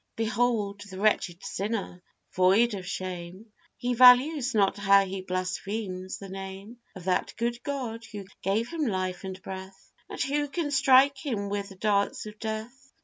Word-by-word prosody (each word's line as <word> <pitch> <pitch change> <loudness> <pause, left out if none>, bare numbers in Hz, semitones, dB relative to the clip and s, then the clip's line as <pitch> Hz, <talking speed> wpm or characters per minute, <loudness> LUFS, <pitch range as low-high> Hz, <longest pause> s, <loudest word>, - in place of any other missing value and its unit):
Behold 225 -3 0
the 190 - -8
wretched 195 -4 +1
sinner 200 -3 -3 0.3
void 195 +6 +4
of 190 -3 -6
shame, 185 +3 -6 0.2
He 245 0 -1
values 255 +2 +6
not 195 -2 +3
how 200 -1 +5
he 190 0 -5
blasphemes 185 +1 -4
the 195 - -9
name 195 +4 -8 0.2
Of 185 - -9
that 180 0 0
good 235 +1 -2
God 245 -5 -4
who 205 -3 -8 0.2
gave 215 +5 0
him 320 -4 -1
life 185 -3 -2
and 190 -1 -6
breath, 190 0 -9 0.2
And - - -7
who 290 +2 0
can 290 0 -3
strike 270 0 +5
him 215 -9 -2
with 200 0 -3
the 195 - -12
darts 200 +1 0
of 210 0 -10
death! 225 +5 -6
205 Hz, 160 wpm, -27 LUFS, 190-240 Hz, 0.3 s, values